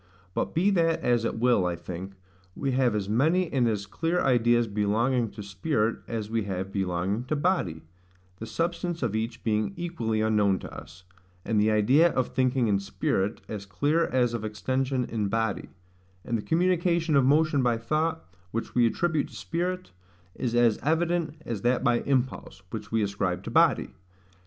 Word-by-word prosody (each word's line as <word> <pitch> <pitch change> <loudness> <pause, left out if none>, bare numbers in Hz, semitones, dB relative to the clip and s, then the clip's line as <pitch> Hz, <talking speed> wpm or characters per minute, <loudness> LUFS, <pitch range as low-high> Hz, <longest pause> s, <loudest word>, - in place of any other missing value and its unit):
But - - -2
be 185 +5 +3
that 165 -3 +2
as 120 -2 +2
it - - -2
will, 120 -4 +3
I 85 - -1
think, 95 +3 -7 0.4
we 135 -1 -1
have 125 -3 +2
as 100 -2 -2
many 160 - +2
and 125 -3 +3
as 105 -3 -1
clear 165 - -1
ideas 120 -3 +3
belonging 110 +3 +1
to 105 - -7
spirit 100 +3 -1
as 110 -3 -3
we 110 -1 -1
have 95 0 -4
belonging 95 +3 -1
to 155 - -1
body, 145 - 0 0.6
the 115 - -6
substance 170 +1 -2
of 110 -3 -1
each 115 +2 -3
being 105 -3 0
equally 120 -11 -2
unknown 105 -3 +2
to - - -9
us; 85 +5 -11 0.4
and 110 -2 +2
the 105 - +3
idea 130 +11 +4
of 130 - 0
thinking 130 -1 +1
in 100 -2 +2
spirit, 100 +1 -1
as 100 -2 -6
clear 150 +11 +1
as 125 -2 +1
of 115 -2 -3
extension 130 +5 -1
in 110 -3 -2
body; 110 0 -1 0.6
and 120 - -1
the 110 - -1
communication 170 - +1
of 135 - +5
motion 150 +1 +3
by 120 -2 +2
thought, 155 - -1 0.2
which 115 +4 -4
we 120 -1 +4
attribute 155 +4 0
to - - -15
spirit, 175 - -3 0.4
is 120 +2 -2
as 120 -2 +4
evident 160 +1 0
as 110 -4 -4
that 120 +3 +1
by 120 -1 +3
impulse, 130 -7 -1
which 110 - -6
we 110 -1 +2
ascribe 100 -3 -2
to - - -6
body. - - +3
120 Hz, 175 wpm, -27 LUFS, 105-145 Hz, 0.6 s, of